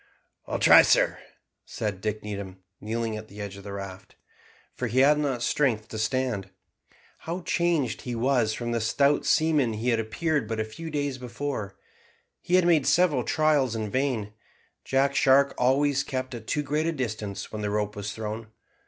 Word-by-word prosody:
"I'll - - -2
try, - - +8
sir," - - +3 0.4
said 105 -3 -4
Dick 105 0 -3
Needham, 100 -3 -7 0.2
kneeling 115 +1 -3
at 110 0 -9
the 105 0 -13
edge 100 -1 -5
of 100 - -11
the 100 - -7
raft, 100 0 -8 0.6
for 125 - -3
he 125 +4 +2
had 150 +2 +5
not 135 -5 -1
strength 115 -6 0
to 110 - -5
stand. 110 -4 -1 0.7
How 170 +3 -5
changed 170 -7 0
he 125 -1 -4
was 120 -2 +1
from 120 -1 -4
the 115 -1 0
stout 140 +6 +2
seaman 150 -7 +3
he 110 +3 -2
had 115 -2 +2
appeared 140 +4 -1
but 115 0 -3
a - - +1
few 160 +10 -8
days 145 -3 -2
before. 120 -5 -5 0.6
He 180 +1 +3
made 165 -5 +3
several 165 -8 +3
trials 150 -6 +2
in 110 -2 -3
vain. 125 -6 -1 0.5
Jack 135 +1 +1
Shark 135 +1 +4
always 135 +2 +2
kept 130 -2 -4
at 115 -2 -8
too 150 - 0
great 150 +3 -1
a - - +1
distance 110 -8 -4
when 110 - -5
the 105 - -1
rope 105 0 -1
was 100 0 -4
thrown. 110 0 -5
120 Hz, 180 wpm, -26 LUFS, 110-140 Hz, 0.7 s, try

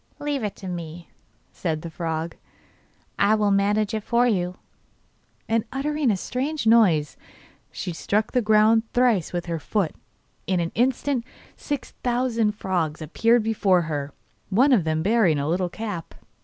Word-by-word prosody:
'Leave 290 -4 -2
it 210 - -3
to 190 - -9
me,' 170 -1 -7 0.4
said 160 -3 -3
the 170 - -5
frog, 165 0 -3 0.8
'I 215 +2 +4
will 210 -1 +2
manage 205 +1 +2
it 220 - -1
for 235 +3 +2
you.' 180 -6 0 0.9
And, 225 -1 +1
uttering 295 0 0
a 205 - +2
strange 275 - -3
noise, 195 -10 +4 0.5
she 180 - -5
struck 210 +6 -1
the 250 - +2
ground 220 +1 +4
thrice 240 -8 +2
with 175 -1 -3
her 170 -1 -3
foot. 190 0 -1 0.5
In 185 -2 +1
an 170 -1 -2
instant 255 +1 +1 0.3
six 290 -3 -5
thousand 240 -3 +1
frogs 175 -7 -2
appeared 225 +9 +2
before 200 -5 +2
her, 145 -3 -4 0.4
one 250 +9 +4
of 195 -10 +3
them 160 0 0
bearing 200 -6 +3
a 140 0 -1
little 180 +2 0
cap. 205 -4 -6
205 Hz, 155 wpm, -24 LUFS, 170-235 Hz, 0.9 s, I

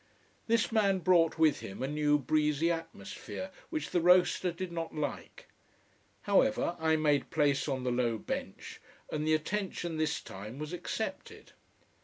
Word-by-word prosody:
This 230 0 +2
man 200 -4 +3
brought 175 -3 +3
with 160 -2 +4
him 95 +6 -7
a - - 0
new 150 0 +2
breezy 150 +2 +1
atmosphere, 165 - -6 0.2
which 315 -2 -3
the 175 - +2
roaster 180 +1 +4
did 175 +1 -6
not 165 -1 -4
like. 150 -2 -5 0.8
However, 205 -2 +2
I 160 0 +3
made 150 -3 +1
place 145 -3 +1
on 130 -3 -2
the 125 - 0
low 120 -2 +1
bench, - - -6 0.3
and 155 0 -2
the 155 - +4
attention 175 0 -3
this 155 0 0
time 105 +6 -9
was 155 +3 -6
accepted. 180 +5 -5
160 Hz, 150 wpm, -31 LUFS, 145-180 Hz, 0.8 s, with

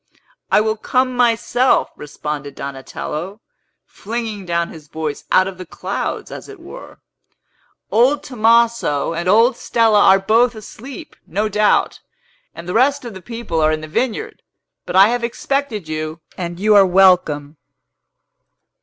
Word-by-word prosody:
"I - - +5
will 220 0 -1
come 255 +3 0
myself," 245 +1 +2
responded 150 -1 -6
Donatello, 150 +7 -6 0.5
flinging 220 -3 -6
down 170 0 -1
his 155 -2 -12
voice 155 -1 -5
out 185 0 +4
of 190 -1 -8
the 185 - -7
clouds, - - -4
as - - -9
it 410 -2 -11
were; 355 +9 -12 0.9
"old 270 +6 +3
Tomaso 230 - +2
and 170 +2 -2
old 230 +5 +4
Stella 225 -3 +2
are 195 -1 +6
both 225 +5 +2
asleep, 255 - -10
no 210 +2 -1
doubt, 210 0 +1 0.6
and 170 - -9
the 180 - -3
rest 275 +3 +2
of 235 - -7
the 190 - -10
people 230 -6 -4
are 155 0 +3
in 155 0 -2
the 155 - -8
vineyard. 260 - -3 0.5
But - - -4
I 195 +3 +7
have 240 0 -1
expected 235 - -2
you, 155 +1 -4 0.2
and 175 -1 -5
you 210 +2 +3
are 200 -1 +7
welcome!" 180 -6 +3
210 Hz, 145 wpm, -18 LUFS, 170-235 Hz, 0.9 s, I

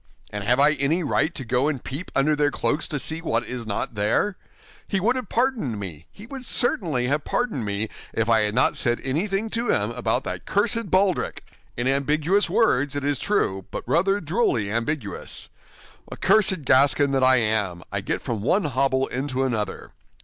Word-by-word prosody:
And 105 -1 -4
have 120 +5 +2
I 145 +2 +6
any 155 +4 0
right 160 +2 +1
to 135 - -4
go 125 +3 +1
and 140 -5 -2
peep 145 +7 -5
under 150 +3 +3
their 145 0 +2
cloaks 145 +1 -1
to 150 - -3
see 160 +4 -3
what 120 -7 -1
is 120 -3 -6
not 115 +5 -3
there? 105 - 0 0.5
He 195 - 0
would 235 +7 +2
have 255 -6 -4
pardoned 230 - 0
me, 85 -5 -8
he 210 - -12
would 265 +1 -8
certainly 170 - +1
have 140 +3 0
pardoned 225 - -1
me, 100 +2 -2 0.2
if 115 0 -1
I 115 -1 +4
had 105 0 -1
not 130 - +4
said 120 0 0
anything 195 +10 -1
to 235 +1 -1
him - - +1
about - - -1
that - - -6
cursed 230 -4 +1
baldric—in 185 -9 -1
ambiguous 150 +8 +1
words, 145 - +2
it 145 - -2
is 140 -2 0
true, 95 - 0
but - - -5
rather 195 +4 +2
drolly 150 - 0
ambiguous. 115 0 -3 0.6
Ah, - - -5
cursed 190 -6 +3
Gascon 140 +2 +4
that 135 -1 +1
I 130 0 +6
am, 105 -7 0
I 100 0 -2
get 100 - -3
from 115 -6 -3
one 185 - +2
hobble 135 -1 +1
into 130 0 -2
another. 115 -5 -3
140 Hz, 185 wpm, -24 LUFS, 120-180 Hz, 0.6 s, I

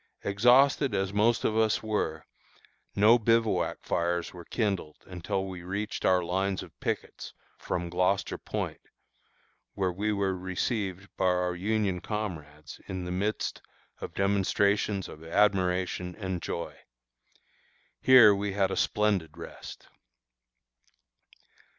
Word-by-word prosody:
Exhausted 125 +4 +4
as 95 0 -1
most 115 +3 +2
of 110 - +1
us 110 -1 +2
were, 95 -8 -2 0.7
no 110 +4 +6
bivouac 115 0 +1
fires 85 0 -1
were 90 -1 -10
kindled 100 -9 -2
until 95 +2 -3
we 95 -2 -7
reached 100 +5 -4
our 90 -1 +4
lines 95 +2 -1
of - - -13
pickets - - -4 0.2
from 85 -1 -3
Gloucester 90 +3 0
Point, - - -4 0.9
where 95 -2 0
we 105 +4 -1
were 100 -2 0
received 95 +1 -3
by 95 - 0
our 90 0 +1
Union 100 0 -1
comrades 80 -8 -6
in 95 -1 -4
the 90 - -4
midst 100 +4 -2 0.4
of - - -7
demonstrations 100 0 +1
of 75 - -11
admiration 90 -1 +1
and 95 -4 -4
joy. 85 - -5 1.2
Here 125 -5 +8
we 100 0 -2
had 95 -1 +1
a - - -2
splendid 95 -7 0
rest. 85 - -10
95 Hz, 120 wpm, -28 LUFS, 90-105 Hz, 1.2 s, Here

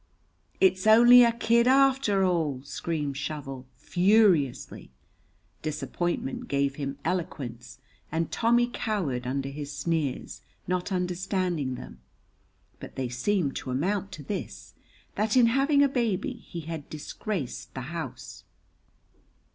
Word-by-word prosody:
"It's 190 +1 +3
only 240 +3 +9
a 235 - +4
kid 235 +1 +2
arter 265 -7 +4
all!" 160 -8 0
screamed 145 0 -3
Shovel, 135 -4 -5
furiously. 180 - +2 0.7
Disappointment 155 -1 -3
gave 140 -1 0
him 140 -1 -4
eloquence, 125 -9 -4 0.3
and 160 +1 -1
Tommy 240 +1 +3
cowered 160 - -2
under 135 +1 -2
his 145 0 -6
sneers, 155 -3 -2 0.3
not 180 +2 -1
understanding 180 -6 -1
them, 65 - -10 0.8
but - - -10
they 130 -2 -2
seemed 140 +4 0
to - - -6
amount 190 +9 -1
to 155 -5 -8
this, 195 +8 -6 0.4
that 215 +3 +1
in 245 - +7
having 275 +4 +3
a - - +5
baby 245 0 -1
he 195 -8 -9
had 160 -2 -7
disgraced 155 - -5
the 130 - -4
house. 165 -2 -7
175 Hz, 120 wpm, -27 LUFS, 140-215 Hz, 0.8 s, only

